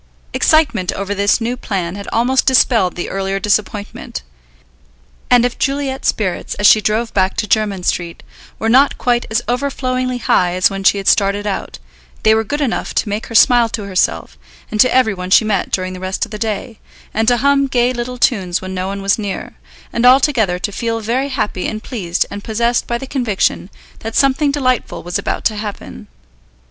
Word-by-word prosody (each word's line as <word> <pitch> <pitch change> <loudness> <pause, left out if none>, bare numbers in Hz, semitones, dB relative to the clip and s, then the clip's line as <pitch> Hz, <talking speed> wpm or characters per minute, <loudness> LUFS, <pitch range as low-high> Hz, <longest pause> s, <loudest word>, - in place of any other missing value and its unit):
Excitement 285 - +2
over 200 +1 -3
this 200 +2 +2
new 235 +2 -2
plan 185 -7 -3
had 200 0 -8
almost 250 +3 +1
dispelled 235 -7 +3
the 175 - -4
earlier 195 0 -2
disappointment, 205 0 -2 1.1
and 245 -1 +5
if 245 - -3
Juliet's 275 -2 -1
spirits, 190 -5 -1
as 205 - -2
she 215 +1 +7
drove 220 +2 -1
back 190 -1 +1
to - - 0
Jermyn 205 -3 0
Street, 170 -1 -2 0.3
were 225 - -2
not 265 +5 +4
quite 240 -1 0
as 220 +2 0
overflowingly 255 -1 -1
high 180 -5 +1
as 185 +2 +3
when 195 0 -5
she 200 - +4
had 195 - -5
started 200 0 +2
out, 200 -2 -4 0.5
they 220 - +5
were 220 0 +2
good 290 +7 -3
enough 260 -5 -2
to - - 0
make 210 +2 -3
her 230 - -8
smile 240 0 +5
to 215 -1 -4
herself 130 - -1 0.3
and 215 - -3
to 255 - +5
every 250 -4 +3
one 180 -1 -6
she 215 - +5
met 205 -4 0
during 185 0 -1
the 185 - -8
rest 185 +3 -2
of 225 - -18
the 210 - -6
day, 225 +1 -4 0.3
and 220 +1 0
to 245 0 +4
hum 275 +2 +2
gay 250 -1 +1
little 250 +1 -5
tunes 190 -8 +1
when 190 0 -7
no 185 0 -3
one 195 0 -5
was 200 +3 +2
near, 200 -2 -5 0.4
and 235 - -1
altogether 250 -7 +4
to 195 +3 -3
feel 230 +2 -2
very 245 +6 -1
happy 215 -8 -2
and 215 0 -5
pleased 185 -8 -2
and 205 0 -7
possessed 235 +2 0
by 235 - -1
the 270 - -7
conviction 235 -8 -1 0.3
that 225 0 -6
something 275 +1 +3
delightful 255 -4 -1
was 175 0 -2
about - - -3
to 215 - +1
happen. 210 -1 -7
220 Hz, 195 wpm, -17 LUFS, 195-245 Hz, 1.1 s, she